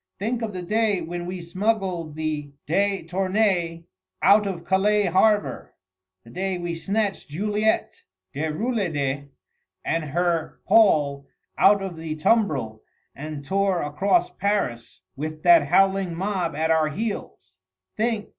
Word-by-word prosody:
Think 230 +4 -2
of 225 -2 -3
the 180 -2 -6
day 210 +1 +1
when 175 +1 -5
we 180 0 -5
smuggled 185 -4 -2
the 155 -2 -3
de 195 +3 +1
Tournais 185 -2 0 0.4
out 205 +1 +5
of 175 -3 -5
Calais 205 +2 +2
harbour, 205 +4 +1 0.5
the 115 - -15
day 190 +1 -2
we 175 -1 -4
snatched 195 +2 -2
Juliette 210 +7 -1 0.3
Déroulède 150 - -2 0.6
and 165 -1 -1
her 170 +1 -1
Paul 145 -10 +3 0.3
out 200 0 +4
of 185 -4 -6
the 160 -1 -5
tumbril 150 - +1 0.3
and 150 -1 -7
tore 195 0 +1
across 170 - +1
Paris 185 - -2
with 155 +2 -6
that 170 -4 +6
howling 195 +1 +2
mob 180 -3 -2
at 160 +2 0
our 160 -1 +3
heels! 210 +7 -6 0.4
Think! 220 -1 -1
180 Hz, 125 wpm, -24 LUFS, 155-205 Hz, 0.6 s, that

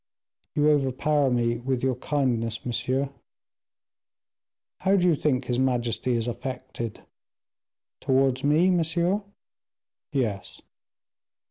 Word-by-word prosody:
"You 150 +1 +4
overpower 140 0 +2
me 120 -1 +1
with 125 +1 -2
your 130 -1 +2
kindness, 120 -4 -1
monsieur." 130 +3 -1 1.7
"How 195 +1 +3
do 180 -2 +3
you 175 - +5
think 135 -3 0
his 125 0 -1
majesty 125 -1 0
is 115 0 -1
affected?" 120 -2 -5 1.0
"Towards 130 -1 +2
me, 155 +6 +4
monsieur?" 175 +3 +1 0.9
"Yes." 115 -9 -2
130 Hz, 100 wpm, -26 LUFS, 120-150 Hz, 1.7 s, you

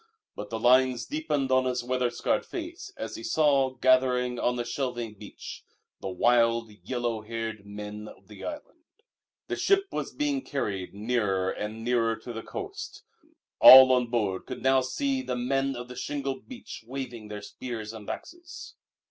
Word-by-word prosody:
But 105 0 -7
the 115 - -3
lines 125 +1 +4
deepened 150 - -1
on 130 0 +4
his 125 -1 -1
weather 125 0 0
scarred 120 - 0
face 345 +2 -7
as - - -5
he 335 - -8
saw, 140 - +2
gathering 125 -1 +3
on 125 - +1
the 120 -1 -2
shelving 120 -4 -3
beach, 105 - -10 0.4
the - - -5
wild, 115 +3 +2
yellow 120 -3 -2
haired 110 -2 -5
men 105 +1 -7
of - - -14
the 105 - -11
island. 310 +2 -7 0.7
The - - -2
ship 395 0 +3
was - - -3
being 290 -2 -1
carried 100 - -3
nearer 100 -4 0
and 110 +2 -5
nearer 115 -1 +2
to 120 +2 -9
the 115 - -5
coast. - - -7 0.6
All 130 0 +11
on 125 -1 +3
board 105 -6 -1
could - - -6
now 130 0 +4
see 265 - -1
the 255 - -3
Men 135 +2 0
of 120 0 -6
the 125 - -9
Shingle 140 -1 -3
Beach 250 - -9
waving 125 -4 -6
their 105 -1 -7
spears 115 -3 -6
and 110 -2 -9
axes. 345 0 -8
125 Hz, 165 wpm, -28 LUFS, 115-135 Hz, 0.7 s, All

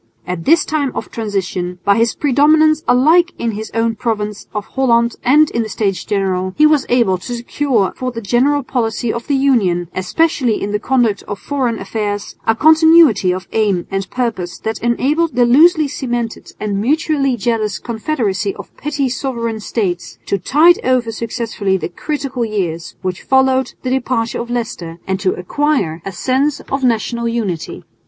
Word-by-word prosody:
At 180 -2 -5
this 335 +4 +4
time 290 -4 -1
of - - -5
transition, 190 -5 -3
by 200 0 +4
his 230 0 +1
predominance 305 +3 +3
alike 320 +8 +4
in 235 - -1
his 215 +1 -6
own 230 0 +1
province 210 -2 -3
of 210 -1 -4
Holland 235 -3 +1
and 295 +4 +4
in 235 - 0
the 220 - -4
States 195 -4 -1
General, 185 -2 -1
he 305 - +6
was 305 -2 +3
able 230 -7 +2
to 245 +6 -5
secure 240 -3 0
for 255 0 -3
the 235 - -6
general 260 +7 +1
policy 235 -2 -1
of 235 - -6
the 285 - +1
Union, 200 -11 +1
especially 240 - 0
in 205 - -3
the 210 - 0
conduct 240 -4 +1
of 205 - -4
foreign 255 -2 -2
affairs, 205 -2 -4
a 225 - +4
continuity 315 - +5
of 185 0 -4
aim 205 -5 +1
and 195 -1 -3
purpose 220 -8 -3
that 220 0 -4
enabled 280 +6 0
the 245 -1 +4
loosely 305 +5 +5
cemented 240 -4 -4
and 200 -2 -2
mutually 275 0 +1
jealous 215 -2 -1
confederacy 220 -3 -2
of - - -11
petty 290 -2 -1
sovereign 235 -3 -3
states 195 -5 -3
to 200 - -1
tide 315 - +4
over 250 -3 +1
successfully 220 -3 -2
the 170 - -4
critical 275 -5 -3
years 180 -7 -3
which 185 -1 -3
followed 265 0 +2
the 255 - -2
departure 245 -3 -1
of 235 - -7
Leicester, 220 -9 -4
and 190 0 -2
to 190 -1 +1
acquire 180 - -1
a 195 - -5
sense 270 +9 0
of 270 0 -4
national 235 0 0
unity. 210 -9 -3
235 Hz, 170 wpm, -17 LUFS, 205-270 Hz, -, he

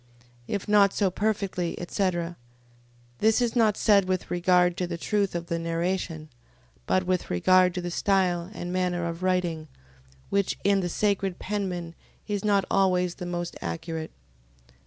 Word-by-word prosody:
If 200 - -3
not 205 -2 +5
so 195 -3 +1
perfectly, 195 -4 -1
etc... 175 -2 -1 0.8
This 220 +2 +3
is 240 -1 0
not 220 -3 +3
said 200 -3 +4
with 185 -1 -2
regard 180 0 +3
to 180 - -1
the 170 -1 -4
truth 200 +1 0
of 170 0 -3
the 170 0 -2
narration; 165 -1 -2 0.6
but 185 - +2
with 185 -1 -1
regard 185 - +4
to 180 - -2
the 175 0 -4
style 180 -2 +1
and 175 -4 -5
manner 180 -1 0
of 170 +1 -4
writing: 180 -4 0 0.6
which 200 -1 +1
in 200 0 +3
the 180 -2 -2
sacred 195 -1 0
penmen 185 -5 -3 0.3
is 205 -1 -2
not 200 -2 +2
always 180 -2 +2
the 180 - -3
most 175 -1 -4
accurate. 165 -1 -4
180 Hz, 155 wpm, -26 LUFS, 175-200 Hz, 0.8 s, not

